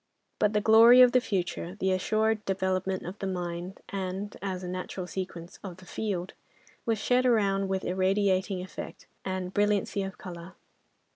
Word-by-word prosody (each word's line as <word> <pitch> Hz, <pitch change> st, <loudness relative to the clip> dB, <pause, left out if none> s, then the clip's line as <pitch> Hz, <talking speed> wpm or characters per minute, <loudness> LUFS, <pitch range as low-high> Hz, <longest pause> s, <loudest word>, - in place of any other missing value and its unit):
But 210 Hz, 0 st, +2 dB
the 210 Hz, -, +2 dB
glory 230 Hz, +4 st, +8 dB
of 250 Hz, -1 st, +8 dB
the 255 Hz, -, +4 dB
future, 180 Hz, -4 st, -3 dB
the 190 Hz, -2 st, 0 dB
assured 215 Hz, +3 st, +1 dB
development 190 Hz, 0 st, -1 dB
of 185 Hz, +4 st, -7 dB
the 195 Hz, -, -3 dB
mine, 180 Hz, 0 st, -4 dB
and, 195 Hz, +1 st, -4 dB
as 190 Hz, -2 st, -3 dB
a -, -, -4 dB
natural 185 Hz, 0 st, -4 dB
sequence, 180 Hz, -2 st, -6 dB
of 185 Hz, -3 st, -7 dB
the 185 Hz, -, -15 dB
"field," 190 Hz, -3 st, -3 dB, 0.5 s
was 225 Hz, -1 st, +2 dB
shed 250 Hz, +4 st, +2 dB
around 200 Hz, -5 st, +2 dB
with 190 Hz, 0 st, -2 dB
irradiating 190 Hz, 0 st, +1 dB
effect 185 Hz, -, -8 dB, 0.2 s
and 185 Hz, -1 st, -3 dB
brilliancy 205 Hz, -1 st, +1 dB
of 195 Hz, -1 st, -5 dB
colouring. 175 Hz, 0 st, -9 dB
190 Hz, 160 wpm, -28 LUFS, 185-205 Hz, 0.5 s, glory